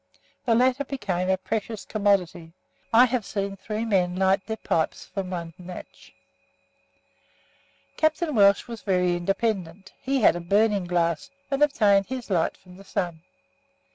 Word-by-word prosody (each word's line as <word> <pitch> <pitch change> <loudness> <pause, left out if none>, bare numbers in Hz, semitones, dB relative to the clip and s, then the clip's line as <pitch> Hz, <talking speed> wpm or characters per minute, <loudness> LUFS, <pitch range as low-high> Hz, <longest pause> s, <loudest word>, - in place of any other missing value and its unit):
The 230 -2 +3
latter 255 +3 +3
became 195 -10 -2
a 190 - +3
precious 215 +2 -4
commodity. 185 -6 0 0.4
I 235 +3 +7
have 250 -2 -1
seen 200 -1 -3
three 215 +3 -4
men 180 -5 +1
light 190 +1 +2
their 220 0 -3
pipes 160 -6 -1
from 190 -1 -5
one 170 -2 -5
match. 180 0 -11 1.9
Captain 315 0 +1
Welch 200 -3 +4
was 230 -2 -7
very 180 -3 +1
independent; 195 0 -2
he 270 0 0
had 200 - +5
a - - -3
burning 200 +2 +2
glass, 170 -2 0 0.2
and 275 +1 0
obtained 210 -9 +4
his 255 -5 -6
light 170 -3 +1
from 180 -1 -16
the 195 - -13
sun. 175 -5 -3
195 Hz, 145 wpm, -25 LUFS, 180-225 Hz, 1.9 s, I